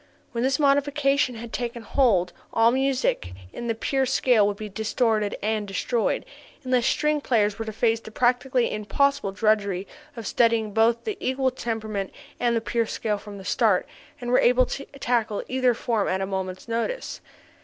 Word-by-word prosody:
When 235 0 -2
this 265 0 +2
modification 280 -2 +2
had 230 0 -8
taken 235 -1 -4
hold 210 -8 +2 0.2
all 230 +1 +4
music 260 - 0 0.2
in 235 - -5
the 230 - 0
pure 265 +4 0
scale 245 -5 +3
would 205 -1 -2
be 215 - -6
distorted 215 +1 0
and 215 -1 -1
destroyed, 225 +4 -1 0.4
unless 255 -1 +2
string 300 0 +1
players 215 -5 +1
were 225 - -3
to 220 - -4
face 225 +1 +1
the 220 - -11
practically 250 +2 +1
impossible 215 +2 +1
drudgery 200 -2 +1 0.3
of 230 - -6
studying 225 -1 +2
both 225 +2 +3
the 425 -2 -3
equal 260 0 0
temperament 220 -5 -4 0.3
and 240 -1 +2
the 230 - +1
pure 230 0 -1
scale 210 -2 -2
from 205 -1 -10
the 190 - -10
start, 215 -6 +2 0.3
and 245 0 -4
were 250 - +5
able 250 +1 +4
to 275 - -5
tackle 230 -5 0
either 255 -2 +2
form 225 -3 0
at 190 - 0
a 190 - -1
moment's 190 0 -4
notice. 235 - -3
230 Hz, 175 wpm, -25 LUFS, 210-255 Hz, 0.4 s, were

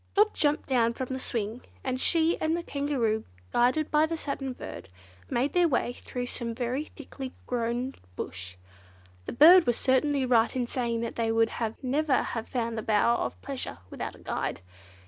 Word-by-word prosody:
Dot 425 +2 +5
jumped 295 0 +1
down 235 -3 +2
from 260 0 -4
the 260 - -3
swing, 230 -1 -2 0.2
and 255 0 -2
she 330 +1 +3
and 315 +1 +1
the 345 - -4
Kangaroo, 270 -8 0 0.3
guided 255 +6 +2
by 305 +1 +4
the 330 0 -3
Satin 275 -3 -4
Bird, 95 - -8 0.4
made 265 +4 0
their 355 -1 +4
way 250 -4 0
through 245 0 -5
some 235 -2 -4
very 255 +5 -2
thickly 265 -4 -8
grown 245 +2 -1 0.2
bush. 90 0 -6 0.7
The - - -2
bird 330 +6 +8
was 240 - +2
certainly 270 +1 +2
right 235 -2 +3
in 250 -2 0
saying 235 -2 -1
that 235 - -4
they 225 -1 +1
would 225 0 +3 0.3
never 285 +2 +2
have 225 -1 -4
found 230 -2 -2
the - - -2
Bower 220 +2 +3
of - - -3
Pleasure 270 - -5
without - - -5
a - - -15
guide. - - -3
255 Hz, 180 wpm, -28 LUFS, 235-290 Hz, 0.7 s, bird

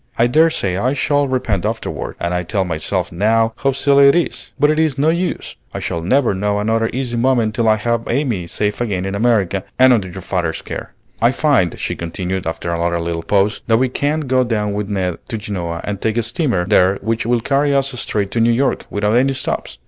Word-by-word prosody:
I 115 - +4
dare 155 +7 +4
say 95 - -2
I 125 +7 +1
shall 145 0 +1
repent 115 -8 -1
afterward, - - -4
and 85 0 -2
I 90 - 0
tell 95 +2 -1
myself 90 +2 -2
now 110 +5 +2
how 135 - +1
silly 140 +1 +4
it 140 - +5
is; 175 - -2
but 145 +2 +4
it's 155 -3 +1
no 145 +3 +3
use, 175 +2 -2 0.2
I - - -2
shall 85 - -3
never 120 +6 +2
know 100 +2 -1
another 115 +2 +1
easy 125 -2 -3
moment 120 -3 +2
till 115 -1 +1
I 110 - +5
have 115 +2 -1
Amy 120 - -1
safe 105 +5 -2
again 95 -6 -1
in 95 - -3
America 100 -4 +1
and 130 0 +6
under 100 -6 0
your 90 +1 -8
father's 85 -4 -2
care." - - -7 0.3
"I 115 - +5
find," 130 - +1
she - - -3
continued 90 +2 -4
after 80 +1 -3
another 85 0 0
little 85 0 -3
pause, 100 +5 +1
"that 115 -1 +4
we 130 +2 +1
can 145 +4 -1
go 130 -3 +2
down 105 -4 -1
with 105 0 -3
Ned 95 -4 -2
to 115 - -2
Genoa 90 -5 -4
and 100 -1 -4
take 110 +1 0
a 120 - +2
steamer 120 - 0
there 95 -1 +4
which 115 +1 -1
will 120 0 +2
carry 140 +4 +1
us 135 0 +1
straight 100 -2 -2
to 120 - -1
New 115 +1 +4
York 130 +4 0
without 105 +1 0
any 135 +3 +3
stops. 130 - -3
110 Hz, 220 wpm, -18 LUFS, 95-130 Hz, 0.3 s, and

